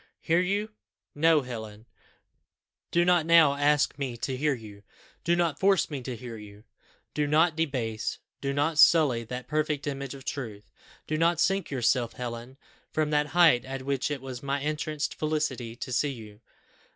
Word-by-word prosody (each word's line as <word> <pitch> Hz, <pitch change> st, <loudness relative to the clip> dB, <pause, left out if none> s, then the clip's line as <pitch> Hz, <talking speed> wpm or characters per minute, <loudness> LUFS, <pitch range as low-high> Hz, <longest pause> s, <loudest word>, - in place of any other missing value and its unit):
"Hear 165 Hz, +2 st, +2 dB
you? 200 Hz, +4 st, -1 dB, 0.4 s
No, 155 Hz, 0 st, +3 dB
Helen, 110 Hz, -3 st, -8 dB, 1.0 s
do 175 Hz, 0 st, +2 dB
not 175 Hz, -2 st, +4 dB
now 165 Hz, -4 st, +6 dB
ask 145 Hz, 0 st, +2 dB
me 130 Hz, -4 st, -3 dB
to 130 Hz, +3 st, -3 dB
hear 145 Hz, +2 st, +1 dB
you. 105 Hz, -4 st, -12 dB, 0.4 s
Do 170 Hz, -, +2 dB
not 170 Hz, -5 st, 0 dB
force 195 Hz, -4 st, +3 dB
me 140 Hz, -3 st, -4 dB
to 125 Hz, 0 st, -5 dB
hear 115 Hz, 0 st, -8 dB
you. 105 Hz, 0 st, -13 dB, 0.5 s
Do 150 Hz, -1 st, 0 dB
not 155 Hz, +2 st, +3 dB
debase, 125 Hz, -9 st, -2 dB, 0.2 s
do 140 Hz, -, -1 dB
not 145 Hz, +3 st, 0 dB
sully, 145 Hz, -9 st, +5 dB
that 125 Hz, +2 st, -6 dB
perfect 150 Hz, -2 st, -1 dB
image 140 Hz, -2 st, -4 dB
of 135 Hz, -1 st, -12 dB
truth. 115 Hz, -8 st, -5 dB, 0.4 s
Do 155 Hz, 0 st, -2 dB
not 170 Hz, 0 st, +2 dB
sink 195 Hz, 0 st, +1 dB
yourself, 125 Hz, -2 st, +1 dB
Helen, 120 Hz, +1 st, -7 dB, 0.3 s
from 155 Hz, -1 st, -1 dB
that 150 Hz, 0 st, +2 dB
height 160 Hz, -9 st, +6 dB
at 135 Hz, 0 st, -6 dB
which 140 Hz, 0 st, -1 dB
it 140 Hz, -3 st, -4 dB
was 130 Hz, -2 st, -7 dB
my 140 Hz, 0 st, -1 dB
entranced 150 Hz, 0 st, -2 dB
felicity 145 Hz, -7 st, -2 dB
to 130 Hz, +1 st, -6 dB
see 145 Hz, +4 st, +1 dB
you. 110 Hz, -4 st, -11 dB
140 Hz, 170 wpm, -27 LUFS, 125-155 Hz, 1.0 s, now